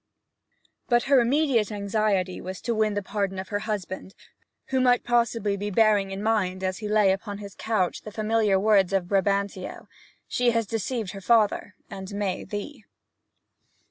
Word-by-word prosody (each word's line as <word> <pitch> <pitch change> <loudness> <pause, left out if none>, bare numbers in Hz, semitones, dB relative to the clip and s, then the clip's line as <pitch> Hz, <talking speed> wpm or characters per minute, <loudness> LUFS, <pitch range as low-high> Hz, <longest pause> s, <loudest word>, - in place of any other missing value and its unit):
But 240 -1 +4
her 275 -1 +5
immediate 245 -4 +2
anxiety 200 -2 0
was 185 +1 -6
to 235 - -1
win 215 -2 +1
the 205 - -2
pardon 200 -1 -2
of 190 0 -6
her 205 - -1
husband, 190 -2 -4 0.5
who 260 -1 +2
possibly 235 -4 0
might 200 - -2
be 205 +1 -2
bearing 205 -1 +3
in 195 +1 -5
mind, 190 -4 0
as 185 0 -2
he 215 - -4
lay 210 -2 +4
upon 200 +1 -3
his 200 -1 -9
couch, 210 -6 -1
the 215 - -9
familiar 215 -2 +1
words 200 -2 +3
of 190 -2 +1
Brabantio, 200 -1 -1 0.4
'She 245 0 +1
has 230 -1 +1
deceived 225 0 -3
her 195 - -8
father, 210 -2 +2
and 195 0 -8
may 200 -3 -2
thee.' 215 +4 -7
205 Hz, 165 wpm, -26 LUFS, 195-225 Hz, 0.5 s, her